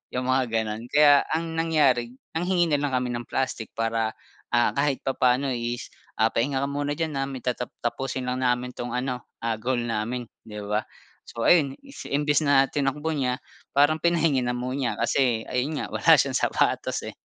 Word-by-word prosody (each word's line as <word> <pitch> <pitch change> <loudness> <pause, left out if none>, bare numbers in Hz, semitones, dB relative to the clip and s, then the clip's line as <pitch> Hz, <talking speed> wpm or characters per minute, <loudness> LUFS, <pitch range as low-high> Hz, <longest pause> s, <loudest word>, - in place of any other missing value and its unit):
yung 130 0 0
mga 130 0 +3
ganon. 110 +1 -2
Kaya 145 -1 +6
ang 165 +1 -1
nangyari 140 -7 +2 0.2
nanghingi 175 0 +1
na 145 - +3
lang 140 -3 -1
kami 125 -1 0
ng 120 -1 -5
plastic 130 -4 -2
para, 115 0 -1 0.4
ah, 120 - +4
kahit 140 -1 0
papaano 130 0 +2
is 120 0 -4 0.2
ah, 110 +1 +2
"Pahinga 135 +3 0
ka 140 - 0
muna 145 0 -2
diyan 155 -3 -2
ah, 135 - -1
may 135 -3 -7
tatap 125 -1 -3
tapusin 130 +2 -2
lang 125 0 -2
namin 125 0 0
'tong 120 0 -5
ano 125 -1 -3 0.2
ah, 115 -2 -1
goal 120 0 -1
namin," 120 +2 -2 0.2
'di 105 -1 -7
ba. 105 +1 0 0.5
So 115 - -5
ayun, 145 -6 +4
is 275 0 -10
imbes 145 0 +2
na 140 -3 +3
tinakbo 145 +2 -1
niya, 130 -5 0 0.4
parang 145 +3 +4
pinahingi 165 -5 +2
na 125 0 -1
mo 125 +1 -3
niya 135 -2 -1
kasi 120 -5 +1
ayun 130 +5 -1
nga - - -5
wala - - +6
siyang - - +2
sapatos, - - 0
eh. - - -5
130 Hz, 190 wpm, -25 LUFS, 120-145 Hz, 0.5 s, Kaya